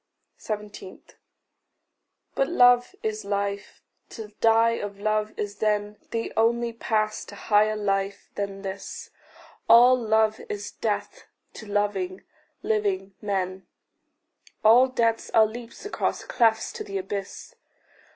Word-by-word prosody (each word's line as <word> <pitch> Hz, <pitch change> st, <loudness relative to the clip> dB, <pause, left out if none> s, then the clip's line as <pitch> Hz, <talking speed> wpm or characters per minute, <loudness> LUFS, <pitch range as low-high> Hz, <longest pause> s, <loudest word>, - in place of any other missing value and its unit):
17. 210 Hz, -3 st, -7 dB, 1.3 s
But 270 Hz, -, 0 dB
love 245 Hz, -6 st, +4 dB
is 215 Hz, 0 st, -2 dB
life. 200 Hz, 0 st, -3 dB, 0.3 s
To 220 Hz, -2 st, -8 dB
die 225 Hz, 0 st, +5 dB
of 200 Hz, -1 st, -6 dB
love 215 Hz, 0 st, 0 dB
is 205 Hz, -1 st, -4 dB
then 210 Hz, -1 st, 0 dB
The 230 Hz, 0 st, -3 dB
only 235 Hz, +1 st, +1 dB
pass 215 Hz, -2 st, -1 dB
to 200 Hz, -, -11 dB
higher 215 Hz, +1 st, +2 dB
life 195 Hz, -1 st, -2 dB
than 200 Hz, -1 st, -5 dB
this. 195 Hz, 0 st, -7 dB, 0.6 s
All 245 Hz, +2 st, +8 dB
love 220 Hz, -2 st, +1 dB
is 205 Hz, 0 st, -5 dB
death 210 Hz, -2 st, -4 dB, 0.3 s
to 220 Hz, -, -10 dB
loving, 200 Hz, -2 st, -1 dB, 0.4 s
living 200 Hz, -3 st, -1 dB
men; 190 Hz, -2 st, -3 dB, 1.0 s
All 235 Hz, +4 st, +7 dB
deaths 230 Hz, -3 st, 0 dB
are 220 Hz, -1 st, +7 dB
leaps 230 Hz, -, -9 dB
across 415 Hz, -, -2 dB
clefts 225 Hz, -2 st, +1 dB
to -, -, -6 dB
the 195 Hz, -1 st, -5 dB
abyss. 195 Hz, -, -6 dB
215 Hz, 120 wpm, -25 LUFS, 200-225 Hz, 1.3 s, All